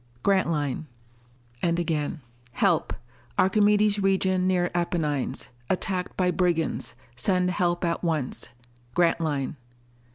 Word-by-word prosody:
Grantline._ 160 -7 +1 0.7
And 170 -1 +1
again: 160 -2 -1 0.3
Help. - - +2 0.5
Archimedes 205 +1 +4
region 190 -1 +2
near 180 -1 +1
Apennines. 165 -5 -1 0.2
Attacked 185 0 -1
by 180 -1 +2
brigands. 175 -3 0 0.2
_Send 180 +7 +2
help 175 0 0
at 170 +1 -1
once. 155 -8 -1 0.5
Grantline. 160 -5 +1
175 Hz, 95 wpm, -26 LUFS, 160-185 Hz, 0.7 s, Archimedes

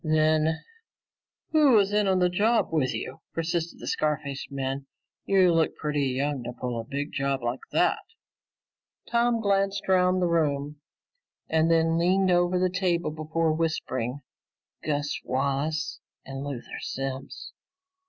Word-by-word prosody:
"Then 155 0 +2 0.9
who 300 -4 +5
was 205 -2 +4
in 210 -1 +3
on 190 -1 +3
this 180 -1 +3
job 220 +6 +2
with 135 -5 +2
you?" 130 - -5 0.2
persisted 165 0 -2
the - - -8
scar 150 -1 0
faced 140 0 -6
man. 135 0 -3 0.4
"You 185 -3 +4
look 165 -1 +2
pretty 150 -2 -1
young 135 +1 -1
to 120 +1 -5
pull 125 -2 -2
a - - -4
big 145 +4 -4
job 135 -2 -1
like 120 +2 -1
that." - - +2 1.1
Tom 235 0 +2
glanced 195 -1 +1
around 185 -1 +3
the 180 - +2
room 150 -3 0 0.7
and 160 +1 +2
then 165 0 +3
leaned 185 +2 +3
over 175 +1 +3
the 185 +1 +3
table 180 -3 0
before 155 +1 0
whispering, 145 -5 -2 0.6
"Gus 145 -1 -1
Wallace 140 +4 -1 0.3
and 135 0 -6
Luther 140 -4 -6
Simms." 135 0 -5
155 Hz, 145 wpm, -27 LUFS, 140-180 Hz, 1.1 s, who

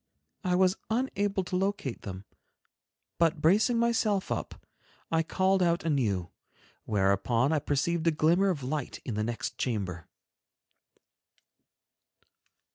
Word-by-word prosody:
I 180 -2 +1
was 185 +1 +3
unable 205 -5 0
to 180 - -4
locate 190 - -1
them, 95 0 -7 0.9
but 165 -1 +3
bracing 210 +10 +3
myself 225 -4 +1
up, - - -4 0.5
I 165 0 +3
called 190 +3 +1
out 170 -1 +2
anew, 110 - 0 0.5
whereupon 105 +6 +2
I 155 - +2
perceived 160 +4 0
a - - +6
glimmer 170 +6 +3
of 150 -8 -2
light 145 +1 -3
in 120 - -3
the 105 +1 -1
next 115 +1 -4
chamber. 95 - -3
165 Hz, 120 wpm, -29 LUFS, 120-190 Hz, 0.9 s, a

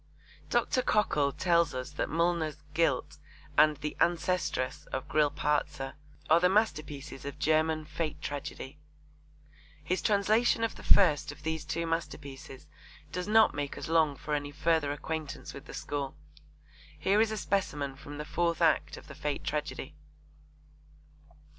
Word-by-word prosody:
Dr. 255 - +2
Cockle 150 - +2
tells 170 -2 +2
us 130 +2 -4
that 150 - -2
Mullner's 165 -2 +1 0.2
Guilt 155 -6 +1 0.4
and 150 0 +5
The 150 +1 -4
Ancestress 175 -6 0
of 130 - -4
Grillparzer 150 -2 0 0.3
are 160 - +6
the 180 +1 +4
masterpieces 155 - -1
of 140 +1 -6
German 155 +1 +2
fate 155 0 -3
tragedy. 145 0 -6 1.0
His 185 +5 0
translation 215 +3 +3
of 230 - 0
the - - -11
first 155 -8 +4
of 145 - -13
these 160 0 -2
two 165 +1 -2
masterpieces 140 -4 -5 0.5
does 180 +1 -3
not 220 +1 +5
make 145 -1 -3
us - - -5
long 160 -3 +3
for 150 - -5
any 145 -1 -1
further 150 0 +1
acquaintance 155 +1 -5
with 140 - -10
the - - -10
school. 140 -2 -3 0.8
Here 200 +3 +3
is 225 - +3
a 215 - -2
specimen 150 -9 -1
from 145 +1 -9
the 150 - -5
fourth 170 0 0
act 165 -2 +2
of - - -12
the - - -10
fate 150 -1 -3
tragedy. 150 -1 -3
155 Hz, 145 wpm, -30 LUFS, 145-170 Hz, 1.0 s, are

